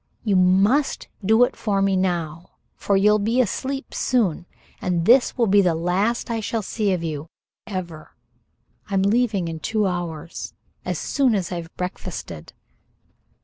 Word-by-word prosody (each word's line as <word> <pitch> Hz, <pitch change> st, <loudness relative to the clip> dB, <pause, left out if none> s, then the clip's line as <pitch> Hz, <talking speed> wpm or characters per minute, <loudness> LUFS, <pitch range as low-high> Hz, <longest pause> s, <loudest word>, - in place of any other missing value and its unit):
I 205 Hz, -, +3 dB
must 195 Hz, +10 st, +3 dB
do 220 Hz, +5 st, +5 dB
it 245 Hz, -, +1 dB
now, 185 Hz, -5 st, 0 dB, 0.3 s
for 200 Hz, -, +1 dB
you'll 210 Hz, +2 st, +4 dB
be 225 Hz, +5 st, +1 dB
asleep 265 Hz, +4 st, -2 dB
soon, 195 Hz, -9 st, 0 dB, 0.3 s
and 175 Hz, -2 st, 0 dB
this 245 Hz, +5 st, +4 dB
will 240 Hz, -, +3 dB
be 200 Hz, -1 st, +5 dB
the 175 Hz, -4 st, +2 dB
last 195 Hz, +9 st, 0 dB
I 230 Hz, -, -1 dB
shall 220 Hz, 0 st, -2 dB
see 205 Hz, 0 st, -1 dB
of 180 Hz, -3 st, -1 dB
you 155 Hz, -1 st, -4 dB, 0.4 s
ever. 175 Hz, -6 st, -6 dB, 0.7 s
I'm 195 Hz, -1 st, +1 dB
leaving 205 Hz, -3 st, +1 dB
in 165 Hz, -1 st, -5 dB
two 215 Hz, +4 st, 0 dB
hours 170 Hz, -3 st, -4 dB, 0.3 s
as -, -, -2 dB
soon 260 Hz, -5 st, +1 dB
as 190 Hz, -3 st, -2 dB
I've 170 Hz, -2 st, -5 dB
breakfasted." 180 Hz, -, -6 dB
195 Hz, 145 wpm, -23 LUFS, 175-220 Hz, 0.7 s, do